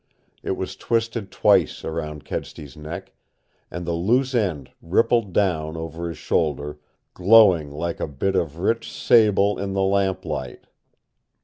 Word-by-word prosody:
It -, -, -3 dB
was -, -, -4 dB
twisted 115 Hz, -3 st, -2 dB
twice -, -, +2 dB
around 75 Hz, -2 st, -5 dB
Kedsty's 70 Hz, -4 st, -6 dB
neck, 75 Hz, +2 st, -8 dB, 0.6 s
and 90 Hz, +1 st, -6 dB
the 85 Hz, -, -2 dB
loose 120 Hz, +10 st, +1 dB
end 90 Hz, -, -1 dB
rippled 110 Hz, +4 st, +2 dB
down 80 Hz, -5 st, 0 dB
over 80 Hz, +1 st, -5 dB
his 85 Hz, -, -7 dB
shoulder, 75 Hz, -1 st, -1 dB, 0.3 s
GLOWING 90 Hz, -5 st, +5 dB
LIKE 80 Hz, +4 st, -4 dB
A -, -, -2 dB
BIT 75 Hz, +7 st, -2 dB
OF 80 Hz, -4 st, -1 dB
RICH 115 Hz, +6 st, -1 dB
SABLE 105 Hz, -3 st, +3 dB
IN 100 Hz, -1 st, -3 dB
THE 95 Hz, 0 st, +1 dB
LAMPLIGHT. 95 Hz, -9 st, -1 dB
85 Hz, 135 wpm, -23 LUFS, 75-100 Hz, 0.6 s, GLOWING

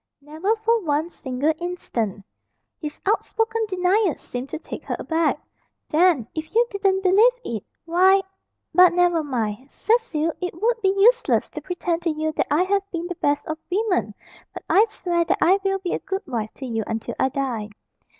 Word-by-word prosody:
"Never 315 Hz, +9 st, -1 dB
for 455 Hz, +1 st, +1 dB
one 310 Hz, +2 st, 0 dB
single 270 Hz, +3 st, -1 dB
instant." 230 Hz, -, -3 dB, 0.5 s
His 300 Hz, -2 st, -6 dB
outspoken 450 Hz, +2 st, 0 dB
denial 370 Hz, -1 st, +2 dB
seemed 250 Hz, +2 st, -6 dB
to -, -, -4 dB
take -, -, -8 dB
her -, -, -2 dB
aback. 325 Hz, -1 st, 0 dB, 0.5 s
"Then, 315 Hz, -7 st, +3 dB
if 315 Hz, +6 st, -6 dB
you 470 Hz, +1 st, +5 dB
didn't 390 Hz, -2 st, +1 dB
believe 405 Hz, +6 st, +6 dB
it, 220 Hz, -4 st, -4 dB, 0.2 s
why 375 Hz, +3 st, +4 dB, 0.5 s
but 365 Hz, -1 st, +7 dB
never 350 Hz, -2 st, +3 dB
mind! 245 Hz, -2 st, -3 dB
Cecil, 360 Hz, -9 st, 0 dB
it 360 Hz, -2 st, -4 dB
would 460 Hz, +3 st, +1 dB
be 385 Hz, -2 st, +3 dB
useless 480 Hz, +5 st, +3 dB
to -, -, -6 dB
pretend 350 Hz, -2 st, -2 dB
to 345 Hz, -, 0 dB
you 310 Hz, 0 st, -1 dB
that -, -, -1 dB
I 300 Hz, +5 st, +3 dB
have 395 Hz, +1 st, +1 dB
been 340 Hz, -1 st, -3 dB
the 355 Hz, 0 st, -4 dB
best 290 Hz, 0 st, +1 dB
of 315 Hz, 0 st, -4 dB
women, 360 Hz, -, 0 dB, 0.4 s
but -, -, -7 dB
I 420 Hz, -, +5 dB
swear 350 Hz, -6 st, -1 dB
that 335 Hz, -, 0 dB
I 380 Hz, +4 st, +4 dB
will 390 Hz, 0 st, +1 dB
be 370 Hz, -2 st, -3 dB
a -, -, -1 dB
good 385 Hz, +1 st, -4 dB
wife 230 Hz, -7 st, -3 dB
to 270 Hz, -, -7 dB
you 225 Hz, -3 st, -2 dB
until 225 Hz, +1 st, -3 dB
I 265 Hz, -, +3 dB
die." 245 Hz, -6 st, -3 dB
345 Hz, 180 wpm, -23 LUFS, 290-390 Hz, 0.5 s, but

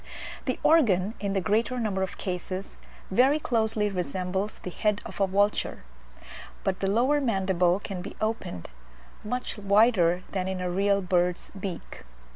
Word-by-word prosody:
The -, -, -1 dB
organ, 215 Hz, -, +4 dB
in 200 Hz, -1 st, -2 dB
the 195 Hz, -, +1 dB
greater 225 Hz, +6 st, +1 dB
number 205 Hz, -4 st, -1 dB
of 190 Hz, -, -3 dB
cases, 185 Hz, +1 st, -5 dB, 0.3 s
very 260 Hz, +9 st, +4 dB
closely 220 Hz, -6 st, 0 dB
resembles 185 Hz, +2 st, -2 dB
the 180 Hz, -, -7 dB
head 210 Hz, +2 st, 0 dB
of -, -, -6 dB
a 195 Hz, -, +4 dB
vulture; 200 Hz, -, 0 dB, 0.8 s
but 190 Hz, -1 st, -1 dB
the 195 Hz, -, 0 dB
lower 255 Hz, +8 st, +3 dB
mandible 190 Hz, -6 st, +2 dB
can 195 Hz, -3 st, -6 dB
be 190 Hz, -, -8 dB
opened 215 Hz, -, -3 dB, 0.5 s
much 250 Hz, 0 st, -3 dB
wider 200 Hz, -4 st, +4 dB
than 185 Hz, -1 st, -2 dB
in 190 Hz, -1 st, -2 dB
a 180 Hz, -1 st, -2 dB
real 200 Hz, +1 st, +2 dB
bird's 180 Hz, -1 st, +1 dB
beak. 190 Hz, -3 st, -7 dB
195 Hz, 150 wpm, -27 LUFS, 185-215 Hz, 0.8 s, organ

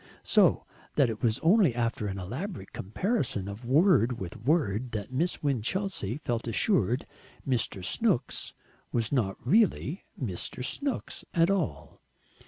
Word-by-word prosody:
So -, -, +4 dB, 0.3 s
that 130 Hz, -5 st, +4 dB
it 110 Hz, -, -7 dB
was 115 Hz, -3 st, +2 dB
only 175 Hz, -, +4 dB
after 115 Hz, -3 st, -1 dB
an 95 Hz, -1 st, -4 dB
elaborate 120 Hz, -, -6 dB
comparison 110 Hz, -, -1 dB
of 100 Hz, +4 st, -7 dB
word 130 Hz, -, +4 dB
with 90 Hz, -4 st, -6 dB
word 125 Hz, -, +1 dB
that 105 Hz, +3 st, -4 dB
Miss 165 Hz, +6 st, 0 dB
Winchelsea 140 Hz, -, -1 dB
felt 120 Hz, -5 st, -3 dB
assured 120 Hz, -, +2 dB, 0.4 s
Mr. 115 Hz, -7 st, 0 dB
Snooks 165 Hz, -, 0 dB, 0.4 s
was 115 Hz, -2 st, 0 dB
not 110 Hz, -9 st, 0 dB
really 200 Hz, -5 st, +2 dB
"Mr. 120 Hz, +2 st, -3 dB
Snooks" 280 Hz, -, -3 dB
at 170 Hz, +2 st, +4 dB
all! 190 Hz, -6 st, -2 dB
125 Hz, 130 wpm, -29 LUFS, 110-170 Hz, 0.4 s, So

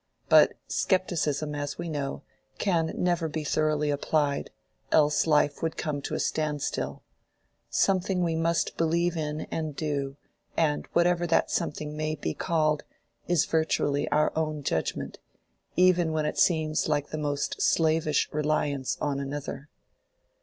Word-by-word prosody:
But -, -, +7 dB
scepticism, 155 Hz, -6 st, 0 dB
as 145 Hz, 0 st, -4 dB
we 170 Hz, -, -4 dB
know, 145 Hz, -3 st, -3 dB, 0.3 s
can 165 Hz, -5 st, +1 dB
never 175 Hz, -2 st, +1 dB
be 155 Hz, 0 st, -4 dB
thoroughly 150 Hz, 0 st, +1 dB
applied, 145 Hz, 0 st, 0 dB, 0.4 s
else 150 Hz, +1 st, +4 dB
life 150 Hz, -2 st, +3 dB
would 165 Hz, -1 st, -2 dB
come 145 Hz, -2 st, -2 dB
to -, -, -4 dB
a -, -, -2 dB
standstill: 150 Hz, -2 st, -2 dB, 0.7 s
something 185 Hz, -1 st, +1 dB
we 165 Hz, -1 st, 0 dB
must 165 Hz, +1 st, 0 dB
believe 170 Hz, +1 st, +1 dB
in 150 Hz, -1 st, -2 dB
and 155 Hz, -3 st, -3 dB
do, 140 Hz, -2 st, -2 dB, 0.4 s
and 150 Hz, -3 st, +1 dB
whatever 175 Hz, 0 st, +3 dB
that 165 Hz, -, +2 dB
something 150 Hz, -2 st, -2 dB
may 155 Hz, 0 st, -1 dB
be 80 Hz, -, -3 dB
called, 155 Hz, -, +1 dB, 0.5 s
it 175 Hz, -, +1 dB
is 165 Hz, -, +3 dB
virtually 160 Hz, -3 st, +1 dB
our 150 Hz, +1 st, +2 dB
own 155 Hz, -2 st, -1 dB
judgment, 80 Hz, -, -2 dB, 0.6 s
even 180 Hz, -3 st, +4 dB
when 155 Hz, -1 st, 0 dB
it 150 Hz, -, -2 dB
seems 155 Hz, -3 st, +2 dB
like 145 Hz, -1 st, 0 dB
the 155 Hz, -, -4 dB
most 145 Hz, -1 st, -2 dB
slavish 155 Hz, -2 st, +2 dB
reliance 150 Hz, -3 st, 0 dB
on 140 Hz, -2 st, -1 dB
another. 140 Hz, +1 st, -5 dB
155 Hz, 140 wpm, -27 LUFS, 145-165 Hz, 0.7 s, But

